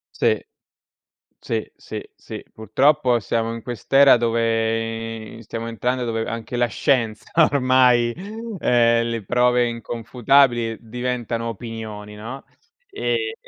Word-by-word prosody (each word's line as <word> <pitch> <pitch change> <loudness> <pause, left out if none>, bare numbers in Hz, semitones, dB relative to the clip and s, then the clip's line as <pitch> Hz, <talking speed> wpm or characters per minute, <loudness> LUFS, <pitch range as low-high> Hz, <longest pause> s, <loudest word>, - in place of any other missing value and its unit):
Sì. - - +1 1.0
Sì, - - -3
sì, - - -7
sì. - - -9
Purtroppo 125 +4 +2
siamo 115 +1 -1
in 115 - -6
quest'era 130 +4 +4
dove 115 -1 -1
i 115 - -12
stiamo 115 +2 -5
entrando, 125 +2 -1
dove 115 -1 -2
anche 115 +1 -5
la 120 - +3
scienza 115 -2 0 0.3
ormai, 130 -3 +4 0.5
ehm, 115 -3 +3
le 115 -2 -3
prove 125 +3 +3
inconfutabili 120 +1 +1
diventano 120 0 -3
opinioni, 110 -2 -7
no? 120 +6 -8 0.5
Ehm 425 +1 -1
115 Hz, 110 wpm, -22 LUFS, 115-125 Hz, 1.0 s, quest'era